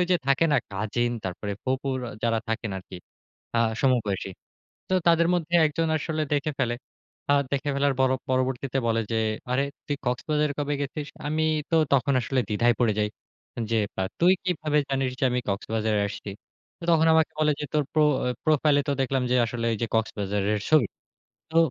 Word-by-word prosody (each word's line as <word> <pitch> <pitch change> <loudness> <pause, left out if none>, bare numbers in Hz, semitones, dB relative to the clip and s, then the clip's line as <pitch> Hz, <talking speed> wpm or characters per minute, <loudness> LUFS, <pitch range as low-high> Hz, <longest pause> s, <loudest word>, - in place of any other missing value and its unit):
যে, - - +5
থাকে 140 +4 +4
না - - +5
কাজিন 110 +4 -1
তারপরে 95 +2 -4
ফুফুর 130 0 -1 0.2
যারা 115 -1 +2
থাকেন 115 -1 -2
আরকি। 95 0 -10 0.6
আ - - +4 0.2
সমবয়সী। 110 -8 +1 0.6
তো 185 - +1
তাদের 170 0 +5
মধ্যে 170 0 -2
একজন 160 +2 -1
আসলে 155 +1 -2
দেখে 145 +2 0
ফেলে। 120 -3 +1 0.6
আ - - +5 0.2
দেখে 140 +1 0
ফেলার 140 0 +2
পর 130 - +5 0.2
পরবর্তীতে 130 +1 0
বলে 115 0 +2
যে, 115 - +2 0.3
আরে 135 +2 +2 0.2
তুই 145 - -1
কক্সবাজারে 150 +4 0
কবে 145 0 -1
গেছিস? 145 +1 -4 0.2
আমি 155 +1 0 0.3
তো 165 - +3 0.2
তখন 140 +1 +2
আসলে 130 +2 0
দ্বিধায় 120 +3 +3
পড়ে 115 -3 +3
যাই। 105 - +1 0.6
যে, 115 - +3 0.2
পা - - 0 0.2
তুই 180 +2 +6
কিভাবে 155 -4 0
জানিস 135 -1 0
যে, - - +2
আমি 125 0 0
কক্সবাজারে 110 +1 0
আসছি? 100 0 -7 0.5
তো 170 - -7
তখন 160 0 +4
আমাকে 160 0 +3
বলে 150 -1 +4
যে, - - -2
তোর 150 -1 +3
প্রো 155 -1 +4 0.4
প্রোফাইল 150 -1 +3
এ - - -2
তো - - +3
দেখলাম 135 0 +1
যে, 125 - +4
আসলে 115 0 -4
ঐ - - +1
যে, - - +2
কক্সবাজারের 105 -1 0
ছবি। 155 -1 +5 0.7
তো, 165 - +1
135 Hz, 175 wpm, -26 LUFS, 115-150 Hz, 0.7 s, তুই